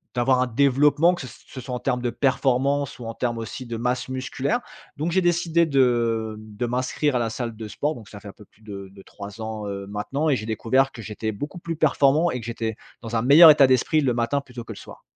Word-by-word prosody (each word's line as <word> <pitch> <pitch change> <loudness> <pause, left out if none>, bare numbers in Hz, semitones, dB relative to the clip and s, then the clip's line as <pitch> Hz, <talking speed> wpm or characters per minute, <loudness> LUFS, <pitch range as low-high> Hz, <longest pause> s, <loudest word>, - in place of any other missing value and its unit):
d'avoir 125 +1 +2
un 130 - +1
développement 140 +7 +3
que 175 - -6
ce - - -7
s - - -14
ce 130 - -10
soit 125 0 -5
en 125 - -4
terme 125 -2 -1
de 120 - -1
performance 135 +2 0
ou 120 - -8
en 115 - -5
terme 120 0 -2
aussi 115 +3 -6
de 115 - -5
masse 125 +2 -2
musculaire, 130 - -2 0.4
donc 155 +4 -2
j'ai 190 - +3
décidé 170 -1 +2
de 120 -6 +1
de 110 +2 -5
m'inscrire 130 +3 -1
à - - 0
la 115 -1 -1
salle 115 0 -4
de 110 -1 -7
sport 145 +9 -2
donc 110 -3 -12
ça 105 - -11
fait 100 - -10
un - - -8
peu 105 - -15
plus 110 - -31
de 100 -3 -8
de 95 - -12
3 105 +3 -10
ans, 110 -1 -5
heu, 100 0 -5
maintenant 135 +10 -2
et 135 - +3
j'ai 110 - -6
découvert 130 +5 +1
que 115 - -9
j'étais 110 0 -4
beaucoup 145 - -6
plus 165 0 -5
performant 150 +2 +3
et 125 - -3
que 115 - -9
j'étais 115 -1 -3 0.3
dans 115 0 -5
un - - +1
meilleur 155 +5 +9
état 140 -3 +6
d'esprit 130 +5 +2
le 130 -3 +1
matin 120 +4 0
plutôt 125 -3 -10
que - - -9
le - - -14
soir. - - -12
125 Hz, 255 wpm, -23 LUFS, 115-140 Hz, 0.4 s, meilleur